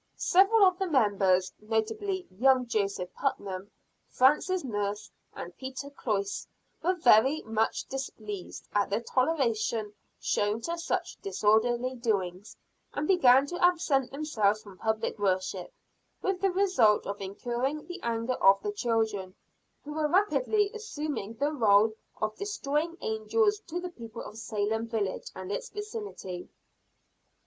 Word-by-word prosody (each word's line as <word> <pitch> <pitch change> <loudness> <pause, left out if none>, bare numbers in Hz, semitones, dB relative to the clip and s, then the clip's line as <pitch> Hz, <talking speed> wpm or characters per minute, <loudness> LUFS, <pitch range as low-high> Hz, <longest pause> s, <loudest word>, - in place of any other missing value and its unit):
Several 395 +4 +5
of 370 -1 +3
the 385 - 0
members, 200 - +2
notably 360 - -2
young 255 +6 +3
Joseph 200 -5 -2
Putnam, 200 -8 -3 0.4
Francis 300 +8 +3
Nurse 205 -4 -3 0.2
and 175 - -7
Peter 265 +1 -6
Cloyse 200 -7 -2 0.3
were 365 +3 +1
very 265 -1 +5
much 220 0 0
displeased 215 -8 -6
at 205 -1 +2
the 205 +2 +1
toleration 235 -6 0 0.3
shown 205 +2 0
to 335 +7 -2
such 335 - -3
disorderly 240 - +2
doings, 205 -5 -2 0.4
and 300 - -1
began 270 -8 +6
to 350 +5 -4
absent 320 -7 +3
themselves 220 -8 0
from 195 -3 -14
public 220 0 -1
worship, 185 -2 -1 0.5
with 385 -1 0
the 390 - +3
result 365 - +3
of 200 0 -5
incurring 240 +9 -3
the 360 +1 -8
anger 230 +2 -2
of 195 0 +7
the 415 - -1
children, 220 - -1 0.5
who 295 - -7
were 305 0 +1
rapidly 415 +3 +2
assuming 300 - -4
the 285 +6 0
role 220 -5 +4 0.3
of 215 0 -1
destroying 335 -5 -2
angels 410 - +1
to 345 +1 -3
the 360 0 -5
people 230 -6 -9
of 210 - -10
Salem 220 +1 -1
village 215 -5 -2
and 185 +1 -6
its - - -3
vicinity. 415 - -6
235 Hz, 135 wpm, -29 LUFS, 210-325 Hz, 0.5 s, of